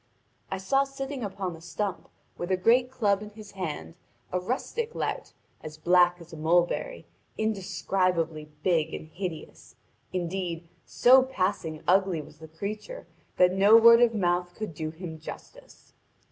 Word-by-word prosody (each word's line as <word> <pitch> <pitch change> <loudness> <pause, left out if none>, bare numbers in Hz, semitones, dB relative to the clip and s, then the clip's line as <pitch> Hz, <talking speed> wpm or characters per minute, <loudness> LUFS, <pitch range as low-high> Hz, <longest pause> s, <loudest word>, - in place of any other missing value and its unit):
I 195 - -2
saw 270 +9 +2
sitting 275 -1 -6
upon 190 -3 -4
a 165 - -14
stump, 190 +2 -4 0.3
with 175 - -5
a 185 - +2
great 240 +6 +3
club 205 -6 +1
in 210 - -8
his 210 -1 -12
hand, 150 - -5 0.4
a 180 - 0
rustic 355 - -3
lout, - - -3 0.3
as 155 0 -9
black 175 +2 +4
as 170 -1 -14
a - - -8
mulberry, 175 - 0 0.3
indescribably 185 -6 -1
big 165 -3 +1
and 155 - -9
hideous; 175 -1 -7 0.4
indeed, 175 -2 -3 0.2
so 260 +2 +6
passing 185 -10 -2
ugly 190 -2 +3
was 150 0 -11
the 160 - -10
creature 210 - -6 0.3
that 180 0 +5
no 200 +4 +7
word 230 +1 +8
of 235 -1 +4
mouth 175 -2 0
could 215 -6 -5
do 155 +1 -4
him 160 0 -8
justice. - - -12
185 Hz, 150 wpm, -27 LUFS, 165-215 Hz, 0.4 s, word